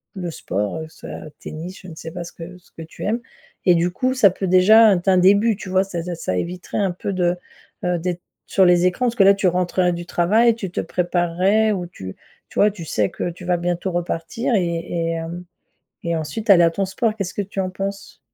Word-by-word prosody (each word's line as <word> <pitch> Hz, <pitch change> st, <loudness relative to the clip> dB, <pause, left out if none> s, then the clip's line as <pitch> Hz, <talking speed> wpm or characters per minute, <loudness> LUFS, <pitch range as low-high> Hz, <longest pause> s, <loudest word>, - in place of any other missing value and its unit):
le 175 Hz, -3 st, -4 dB
sport, 100 Hz, -, -3 dB
heu, 160 Hz, -, -5 dB
soit 155 Hz, -, -9 dB
tennis 170 Hz, +5 st, -8 dB
je 185 Hz, -, -12 dB
ne 165 Hz, -, -10 dB
sais 160 Hz, 0 st, -8 dB
pas 175 Hz, +1 st, -6 dB
ce 170 Hz, -, -11 dB
que 175 Hz, +2 st, -10 dB
ce 180 Hz, -, -25 dB
que 165 Hz, -, -11 dB
tu 160 Hz, -, -10 dB
aimes 230 Hz, +4 st, 0 dB, 0.4 s
et 180 Hz, -, +6 dB
du 170 Hz, +1 st, +1 dB
coup, 255 Hz, +8 st, 0 dB
ça 250 Hz, -6 st, +5 dB
peut 190 Hz, +1 st, -4 dB
déjà 205 Hz, +4 st, +7 dB
être 175 Hz, +1 st, -3 dB
un 185 Hz, -, +5 dB
début, 200 Hz, +5 st, +4 dB
tu 200 Hz, -, -9 dB
vois? 185 Hz, +1 st, +3 dB
Ça 185 Hz, -3 st, -5 dB
de 175 Hz, +1 st, -5 dB
ça 95 Hz, -, -3 dB
éviterait 180 Hz, -, -4 dB
un 195 Hz, -3 st, +1 dB
peu 180 Hz, +3 st, -4 dB
de, 180 Hz, -1 st, +1 dB, 0.5 s
heu, 180 Hz, 0 st, +1 dB
d'être 175 Hz, +1 st, -3 dB, 0.3 s
sur 195 Hz, -, +3 dB
les 175 Hz, 0 st, +4 dB
écrans 185 Hz, +8 st, +1 dB
parce 235 Hz, -, -1 dB
que 200 Hz, -, +5 dB
là, 195 Hz, +1 st, +7 dB
tu 195 Hz, -1 st, +1 dB
rentrerais 180 Hz, 0 st, +1 dB
du 175 Hz, 0 st, -6 dB
travail 220 Hz, +8 st, +3 dB
tu 200 Hz, -5 st, -5 dB
te -, -, -2 dB
préparerais 180 Hz, +5 st, +1 dB
ou 180 Hz, -3 st, -4 dB
tu 95 Hz, -, -9 dB, 0.3 s
tu -, -, -4 dB
vois? 210 Hz, 0 st, +5 dB
Tu 190 Hz, -4 st, -9 dB
sais 105 Hz, -9 st, 0 dB
que -, -, -4 dB
tu 175 Hz, +1 st, -10 dB
vas 180 Hz, 0 st, +2 dB
bientôt 175 Hz, +2 st, -2 dB
repartir 175 Hz, +8 st, -2 dB
et 185 Hz, -4 st, +2 dB
et 165 Hz, 0 st, -3 dB
hem 165 Hz, +2 st, -5 dB, 0.6 s
et 170 Hz, 0 st, 0 dB
ensuite 205 Hz, +8 st, -3 dB
aller 175 Hz, -3 st, +8 dB
à 165 Hz, -, +4 dB
ton 195 Hz, +4 st, -1 dB
sport. 215 Hz, +3 st, -1 dB
Qu'est-ce 195 Hz, -4 st, -4 dB
que 205 Hz, -, -1 dB
tu 200 Hz, 0 st, -9 dB
en 185 Hz, -1 st, -2 dB
penses? 195 Hz, +1 st, -6 dB
180 Hz, 240 wpm, -21 LUFS, 170-195 Hz, 0.6 s, aller